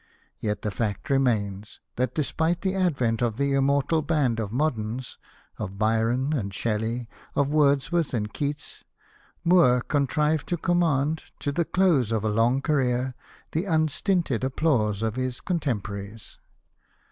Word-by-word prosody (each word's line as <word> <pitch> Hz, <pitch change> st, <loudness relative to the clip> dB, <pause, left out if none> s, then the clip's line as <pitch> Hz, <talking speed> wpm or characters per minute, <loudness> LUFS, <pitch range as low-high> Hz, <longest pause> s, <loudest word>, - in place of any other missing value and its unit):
Yet 105 Hz, -1 st, -2 dB
the 105 Hz, -, -1 dB
fact 105 Hz, +4 st, -3 dB
remains, 110 Hz, -6 st, 0 dB, 0.2 s
that 125 Hz, 0 st, -1 dB
despite 160 Hz, +3 st, 0 dB
the 190 Hz, -1 st, 0 dB
advent 135 Hz, -, +1 dB
of 115 Hz, -2 st, 0 dB
the 140 Hz, 0 st, +1 dB
immortal 140 Hz, +3 st, +2 dB
band 145 Hz, -7 st, +1 dB
of 105 Hz, -3 st, -3 dB
moderns 125 Hz, -3 st, -2 dB, 0.2 s
— -, -, -32 dB
of 95 Hz, +1 st, -5 dB
Byron 115 Hz, +6 st, +1 dB
and 105 Hz, -9 st, -2 dB
Shelley, 115 Hz, +3 st, -2 dB, 0.3 s
of 140 Hz, -1 st, +2 dB
Wordsworth 150 Hz, +2 st, +2 dB
and 105 Hz, -3 st, -2 dB
Keats 145 Hz, 0 st, -4 dB, 0.3 s
— -, -, -32 dB
Moore 165 Hz, -8 st, +5 dB
contrived 150 Hz, +2 st, 0 dB
to 175 Hz, -, -1 dB
command 160 Hz, -3 st, +1 dB, 0.2 s
to 145 Hz, -, -1 dB
the 170 Hz, +3 st, 0 dB
close 160 Hz, -, +2 dB
of 110 Hz, -2 st, 0 dB
a 110 Hz, -, +1 dB
long 115 Hz, +5 st, +2 dB
career 130 Hz, -4 st, +1 dB, 0.4 s
the 160 Hz, +5 st, -1 dB
unstinted 160 Hz, -, +1 dB
applause 125 Hz, -7 st, +1 dB
of 110 Hz, +1 st, -1 dB
his 130 Hz, -1 st, -2 dB
con 180 Hz, -2 st, -1 dB
temporaries. 105 Hz, -5 st, -5 dB
130 Hz, 145 wpm, -26 LUFS, 115-155 Hz, 0.4 s, Moore